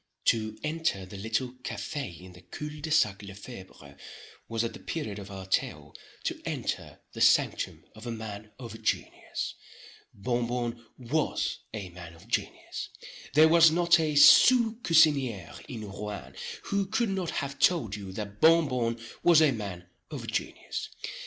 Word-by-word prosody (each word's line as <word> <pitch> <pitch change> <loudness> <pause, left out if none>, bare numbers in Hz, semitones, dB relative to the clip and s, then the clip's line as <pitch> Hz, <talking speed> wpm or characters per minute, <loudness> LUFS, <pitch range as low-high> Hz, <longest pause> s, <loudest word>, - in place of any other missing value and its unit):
To 110 -2 +1
enter 155 - -1
the 95 - -11
little 110 +5 -1
café 135 - -5
in 90 0 -12
the 90 - -14
cul 150 +10 -7
de 160 - -4
sac 105 -10 +3
Le 100 -1 -9
Febre 95 - -11 0.5
was, 115 0 -1
at 115 - -3
the - - -10
period 110 -11 -4
of 100 0 -9
our 95 -1 -7
tale, 95 - -1 0.3
to - - -3
enter - - -4
the - - -6
sanctum - - +3
of 110 +2 -10
a - - -2
man 110 -1 -7
of 115 -3 -9
genius. - - -2 0.6
Bon 120 +3 -1
Bon 120 -1 -3
was 135 +5 -1
a 105 -4 -6
man 85 -1 -11
of 85 +6 -17
genius. 115 - -3 0.5
There 155 +1 +8
was 165 0 +7
not 170 +1 +4
a 155 -2 0
sous 235 - +8
cusinier 140 - +3
in 110 -3 -6
Rouen, 105 0 -7 0.3
who 200 -1 -1
could 220 +2 0
not 190 -3 -2
have 140 -1 -3
told 140 - +3
you 100 -2 -7
that 105 0 -7
Bon 165 0 +6
Bon 120 -3 -1 0.2
was 170 -3 +6
a 155 -3 +5
man 100 -7 -5 0.2
of - - -6
genius. - - -4
115 Hz, 160 wpm, -29 LUFS, 100-155 Hz, 0.6 s, There